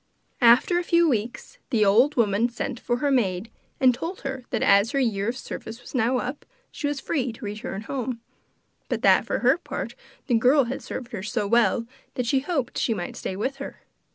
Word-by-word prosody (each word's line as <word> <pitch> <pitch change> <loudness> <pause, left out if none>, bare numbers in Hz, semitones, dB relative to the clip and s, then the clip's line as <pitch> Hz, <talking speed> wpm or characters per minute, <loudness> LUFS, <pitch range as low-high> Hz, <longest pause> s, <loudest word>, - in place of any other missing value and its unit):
After 245 +9 +6
a - - -2
few 340 0 +3
weeks 235 -3 -2
the 225 -5 +3
old 240 +9 +4
woman 225 0 +2
sent 240 +1 -4
for 240 -1 -1
her 285 +2 0
maid 215 -4 0 0.3
and 255 -2 +5
told 335 +9 -5
her 265 -2 -5
that - - -1
as 200 +5 +4
her 275 - +2
year 220 -5 0
of 245 - -3
service 225 -3 -7
was 245 - -13
now 250 0 +2
up, 260 +3 -4 0.3
she 290 - -3
was 290 -1 -2
free 265 -4 -1
to 225 0 -9
return 210 0 -5
home, 250 0 -4 0.7
but - - -2
that, - - +5
for - - -1
her 260 +7 +4
part, - - -5 0.3
the 250 - -1
girl 255 +5 +5
had 255 +2 -4
served 245 -1 -7
her 215 -6 -5
so 210 +1 -2
well 230 +1 +3 0.3
that 250 - -1
she 265 +3 +2
hoped 275 -4 -2
she 225 - +1
might 175 -3 -5
stay 185 - -4
with 260 +8 -2
her. 280 - -8
245 Hz, 210 wpm, -25 LUFS, 220-270 Hz, 0.7 s, After